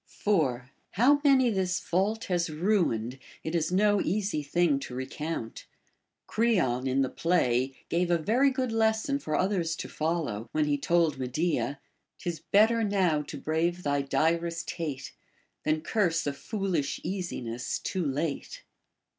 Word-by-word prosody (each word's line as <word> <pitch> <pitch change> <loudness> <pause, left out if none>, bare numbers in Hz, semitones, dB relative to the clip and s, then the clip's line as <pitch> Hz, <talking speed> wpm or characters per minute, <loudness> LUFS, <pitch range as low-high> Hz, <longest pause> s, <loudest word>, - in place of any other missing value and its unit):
4. 130 -11 0 0.2
How 275 +8 +4
many 265 -4 +5
this 185 -3 0
fault 195 +7 0
has 175 -2 0
ruined, 155 - 0 0.2
it 160 - -4
is 165 -1 0
no 205 +2 +3
easy 195 -4 -1
thing 150 0 +2
to 125 - -7
recount. 130 -1 -5 0.6
Creon 175 - +1
in 135 +1 +2
the - - 0
play 130 -6 +1
gave 175 +1 0
a 175 - +4
very 235 - +3
good 260 -2 -2
lesson 225 +5 +1
for 155 - -2
others 180 -4 0
to - - -6
follow, 155 -9 -2
when 155 -1 +2
he 145 -1 +1
told 160 -1 +1
Medea, 140 +2 -1 0.2
— - - -53
'Tis 170 -2 -4
better 225 +3 +3
now 185 -7 +2
to 150 0 -7
brave 170 +4 -1
thy 145 -1 +1
direst 165 +4 0
hate, 150 -6 -5 0.5
Than 155 0 +1
curse 175 -3 +1
a 145 - -1
foolish 185 -3 -2
easiness 130 -10 -3
too 185 -2 -3
late. 145 +1 -3
170 Hz, 145 wpm, -28 LUFS, 145-195 Hz, 0.6 s, many